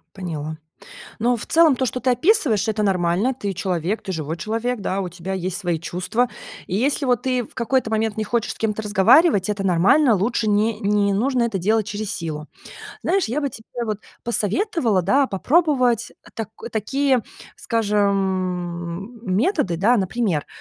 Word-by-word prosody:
Поняла. 160 -5 -5 0.6
Но 240 +2 +2
в - - -7
целом 325 -4 +5
то, 260 - 0
что 255 +1 -3
ты 260 - +1
описываешь, 250 - +2
это 215 -1 0
нормально. 190 +5 +1
Ты 205 -6 -4
человек, 185 +2 -2
ты 190 - -4
живой 160 -2 -3
человек, 225 +4 -2
да, 190 +1 -1
у 190 - -2
тебя 180 +2 -7
есть 185 0 -2
свои 175 -5 -1
чувства. 185 +9 -1 0.4
И 185 - -2
если 275 +6 +1
вот 245 -3 +2
ты 255 -1 0
в - - -15
какой-то 255 0 0
момент 220 -1 -1
не 215 - -1
хочешь 235 +1 -1
с - - -17
кем-то 220 -1 -1
разговаривать, 205 - +4
это 200 -1 -2
нормально. 195 - +4
Лучше 215 +2 0
не 210 +2 +1
не 200 0 +2
нужно 245 +4 +1
это 230 -4 -1
делать 215 +3 +1
через 210 -1 -3
силу. 155 -5 -5 0.6
Знаешь, 390 -1 +2
я 260 +7 -1
бы 285 - 0
тебе 235 0 -7
вот 215 -3 -3 0.3
посоветовала, 235 - +1
да, 265 +9 +3
попробовать 250 - +2 0.2
так 225 -3 -4 0.2
такие, 260 +3 +1 0.3
скажем, 195 -2 -1
м, 185 -5 -1
методы, 245 - +1
да, 220 +8 +3
например, 190 -5 -1
215 Hz, 170 wpm, -22 LUFS, 190-245 Hz, 0.6 s, целом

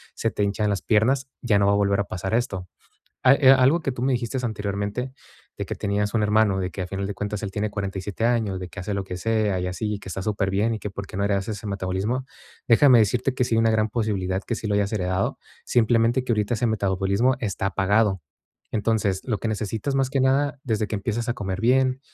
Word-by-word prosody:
se - - -1
te - - -3
hinchan 105 +1 0
las 100 - -1
piernas, 130 +5 +2
ya 105 -4 +3
no 100 - +3
va 100 - +4
a - - +3
volver 100 0 +2
a 100 - 0
pasar 95 +3 -4
esto. 100 -6 -1 0.6
Ah, 130 - +8
eh, 135 -2 +6
algo 135 +5 +5
que 140 - -1
tú 125 -1 -5
me 130 +1 +2
dijiste 125 +1 -2
anteriormente, 105 +3 -3 0.5
de - - -3
que - - -4
tenías 105 +1 -1
un 110 - +2
hermano, 105 -2 +3
de 90 0 -2
que 95 - -5
a 90 - -4
final 95 +1 -4
de 100 - -4
cuentas, 105 +1 -4
él 100 - -3
tiene 105 +1 -2
47 100 +1 -4
años, 110 -6 0
de 90 - -6
que - - -13
hace 100 +2 -3
lo 100 - -1
que 90 -1 -6
sea 110 -1 0
y 90 - -2
así, 100 +4 -3
y 100 - -5
que - - -11
está 95 - -4
superbién, 105 +2 0
y - - -4
que 105 - -5
por 100 0 -7
qué - - -8
no 100 - 0
heredaste 100 +1 0
ese 105 +1 -7
metabolismo, 100 +6 -2 0.4
déjame 125 +1 +7
decirte 125 +5 +1
que 130 - 0
sí 115 -2 0
hay - - +3
una 115 0 +4
gran 110 0 +2
posibilidad 100 -5 -1
que 115 - -1
sí 110 -1 -5
lo 100 - +1
hayas 100 +1 0
heredado, 95 -2 -1 0.3
simplemente, 120 +1 +2
que 125 - -5
ahorita 105 +1 0
ese 120 +2 0
metabolismo 100 +3 +1
está 100 -4 -2
apagado. 100 -1 +1 0.5
Entonces, 105 -3 0
lo 110 -5 -1
que 115 - -3
necesitas, 110 +5 -2
más 135 -1 +1
que 135 - +1
nada, 135 +2 +1
desde 110 -3 0
que - - -5
empiezas 115 +4 -3
a - - +2
comer 95 -5 -4
bien, 130 +2 +2
105 Hz, 240 wpm, -24 LUFS, 100-120 Hz, 0.6 s, Ah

